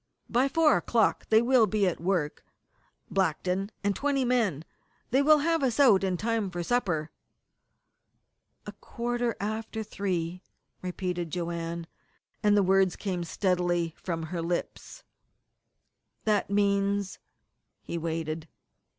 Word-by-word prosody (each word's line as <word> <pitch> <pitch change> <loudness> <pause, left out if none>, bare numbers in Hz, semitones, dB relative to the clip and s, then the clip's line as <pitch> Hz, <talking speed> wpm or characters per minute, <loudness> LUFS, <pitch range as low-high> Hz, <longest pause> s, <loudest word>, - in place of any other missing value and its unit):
"By 245 +3 +3
four 310 -1 +4
o'clock 230 -2 +1
they 220 +1 +5
will 245 -3 +4
be 205 +1 +1
at 180 - 0
work 170 -5 -1 0.7
Blackton 190 +1 0
and 200 -1 +1
twenty 280 -2 0
men. 215 - +1 0.5
They 265 +3 +4
will 305 +2 +6
have 330 +2 +1
us 260 -1 0
out 225 -9 +6
in 185 -2 0
time 225 0 -1
for 175 -1 -4
supper." 170 -9 0 1.5
"A - - -6
quarter 240 -1 -3
after 220 +2 -3
three," 180 -4 -3 0.4
repeated 180 -2 -3
Joanne, 170 0 -4 0.6
and 205 0 +4
the 200 - +4
words 190 -1 +3
came 185 -4 -3
steadily 175 -2 0
from 165 -3 -4
her 170 +1 -4
lips. 175 - -4 1.2
"That 210 -3 +1
means 200 -1 +1 0.3
" - - -52
He 170 - -4
waited. 160 -1 -3
195 Hz, 125 wpm, -28 LUFS, 175-225 Hz, 1.5 s, will